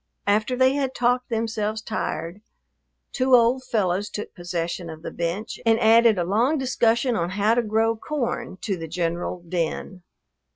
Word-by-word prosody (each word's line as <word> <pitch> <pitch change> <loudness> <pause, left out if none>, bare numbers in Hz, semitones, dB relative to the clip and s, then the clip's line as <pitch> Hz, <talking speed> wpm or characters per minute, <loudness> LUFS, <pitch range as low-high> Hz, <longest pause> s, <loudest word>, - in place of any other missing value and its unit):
After 215 +5 +1
they 260 +1 +4
had 275 -2 -1
talked 245 +1 +1
themselves 220 -2 -1
tired, 210 -4 -4 0.7
two 260 -1 +4
old 245 +2 +3
fellows 205 -5 0
took 210 - -6
possession 175 -1 -4
of 160 0 -9
the - - -5
bench 175 +5 -3
and 225 -1 +3
added 225 -1 +5
a 175 - +1
long 230 - +2
discussion 245 -2 +1
on 170 -4 -1
how 205 +4 +2
to 240 - +2
grow 225 +1 +1
corn 240 -5 -3
to 200 - -1
the 165 -2 -6
general 170 +1 -3
din. 180 +2 -3
220 Hz, 160 wpm, -24 LUFS, 180-240 Hz, 0.7 s, added